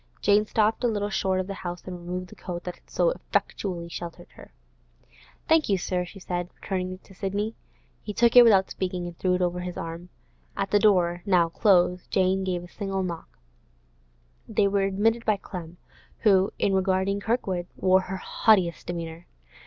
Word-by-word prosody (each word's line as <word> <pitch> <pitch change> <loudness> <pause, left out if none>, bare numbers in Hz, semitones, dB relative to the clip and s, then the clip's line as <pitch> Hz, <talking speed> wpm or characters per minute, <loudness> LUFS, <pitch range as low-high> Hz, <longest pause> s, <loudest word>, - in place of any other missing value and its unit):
Jane 210 +1 +3
stopped 220 +3 +1
a - - +4
little 205 -2 -1
short 190 -1 0
of 185 - -1
the 195 - -5
house 175 -2 -6
and 185 - -6
removed 180 +1 -5
the - - -13
coat 175 -2 -6
that 180 - -5
had - - -25
so - - +2
effectually 180 - -2
sheltered 170 0 -8
her. - - -15 1.0
'Thank 320 -4 +3
you, 195 - +3
sir,' 180 0 -2
she 185 - -12
said, 175 -1 -3
returning 185 -1 -3
it 185 - -12
to - - -17
Sidney. 200 +3 -2 0.5
He 210 - -5
took 235 +3 +3
it 245 - +12
without 200 -5 +5
speaking, 180 -1 -3
and 175 -1 -7
threw 180 +1 +1
it 180 - 0
over 180 0 -1
his 180 -1 -5
arm. 165 +2 -6 0.5
At 195 0 -2
the 205 - +5
door, 180 -5 +3
now 180 -4 +3
closed, 180 -1 +2
Jane 190 0 +2
gave 180 -2 -2
a - - -10
single 195 0 -3
knock; 165 - -6 1.1
they 205 - +2
were 200 0 +1
admitted 220 +4 +1
by 215 -2 +2
Clem, 175 -3 -8 0.4
who, 195 -3 +4
in 195 - +1
regarding 190 +1 +1
Kirkwood, 200 -5 -1
wore 185 0 +4
her 190 +1 -5
haughtiest 185 -3 +2
demeanour. 170 -1 -6
185 Hz, 185 wpm, -26 LUFS, 175-200 Hz, 1.1 s, it